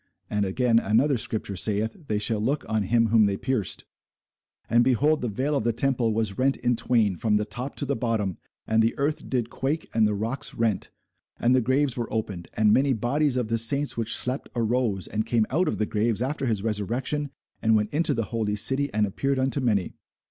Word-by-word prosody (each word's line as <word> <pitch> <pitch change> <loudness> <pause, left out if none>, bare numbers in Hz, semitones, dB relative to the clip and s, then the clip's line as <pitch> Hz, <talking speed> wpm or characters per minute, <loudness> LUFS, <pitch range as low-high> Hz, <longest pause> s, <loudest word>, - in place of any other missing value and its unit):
And 105 -1 +1
again 115 +4 +2
another 120 +7 +2
scripture 105 -2 -1
saith, 105 +3 0
They 105 - 0
shall 105 +1 -1
look 135 +8 -1
on 110 -1 0
him 115 +3 +2
whom 110 -1 +5
they 100 -1 0
pierced. 125 -6 -2 0.8
And, 120 +1 +4
behold, 145 +5 +2
the 120 - -2
veil 135 +8 -1
of 140 - 0
the 115 0 +1
temple 125 -2 +1
was 110 -1 -1
rent 135 +1 +2
in 120 0 0
twain 110 -5 +1
from 105 +4 +1
the 105 - -1
top 125 +5 -5
to 145 - +1
the 140 +1 -1
bottom; 110 -6 -2 0.3
and 110 0 +2
the 115 +1 0
earth 145 +2 -2
did 120 -3 -1
quake, 140 +5 -2
and 110 -2 +3
the 105 - -1
rocks 115 +6 -1
rent; 115 -5 -1 0.5
and 120 +2 +3
the 130 - +4
graves 130 +2 +1
were 120 -2 -4
opened; 100 -6 -4
and 105 -1 +4
many 135 0 +3
bodies 130 +4 +1
of 120 -3 -1
the 115 0 +1
saints 140 +6 +1
which 115 -1 +1
slept 130 +2 +1
arose, 115 -4 0
and 110 +1 -3
came 115 -2 +2
out 175 +7 +1
of - - -1
the 105 - 0
graves 110 +2 0
after 135 0 -2
his 105 -4 -1
resurrection, 120 +7 -2 0.3
and 110 0 +3
went 105 0 0
into 165 +3 +2
the 115 - 0
holy 110 -2 -1
city, 135 +7 +1
and 105 0 +1
appeared 135 +7 -1
unto 130 0 +1
many. 105 -7 0
115 Hz, 215 wpm, -25 LUFS, 105-130 Hz, 0.8 s, whom